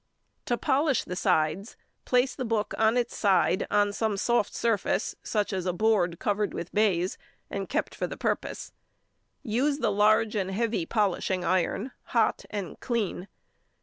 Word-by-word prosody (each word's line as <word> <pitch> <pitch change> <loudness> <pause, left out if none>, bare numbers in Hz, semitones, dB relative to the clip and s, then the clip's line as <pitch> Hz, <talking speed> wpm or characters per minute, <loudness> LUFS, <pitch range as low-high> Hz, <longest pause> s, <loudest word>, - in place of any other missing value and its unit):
To 240 - 0
polish 275 +2 +2
the 180 - -5
sides, 180 +2 0 0.3
place 250 +1 +2
the 260 - -4
book 225 -3 -1
on 220 +2 +3
its 245 - -1
side 195 -1 +2
on 205 0 +2
some 220 0 0
|143| - - -4
soft 235 -2 +1
surface, 225 -2 0
such 210 -2 -1
as 185 -1 -2
a 180 - +1
board 180 -4 +2
covered 205 +1 -1
with 170 - -6
baize, 190 -3 +1 0.3
and - - -4
kept - - -1
for - - -3
the - - -7
purpose. - - -3 0.7
Use 270 +4 +1
the 230 -7 +1
large 215 +2 +3
and 190 -2 -1
heavy 215 -3 -1
polishing 190 -3 0
iron, 185 +7 0
hot 230 -2 +1
and 200 -6 -5
clean. 210 -6 -2
210 Hz, 160 wpm, -27 LUFS, 190-230 Hz, 0.7 s, on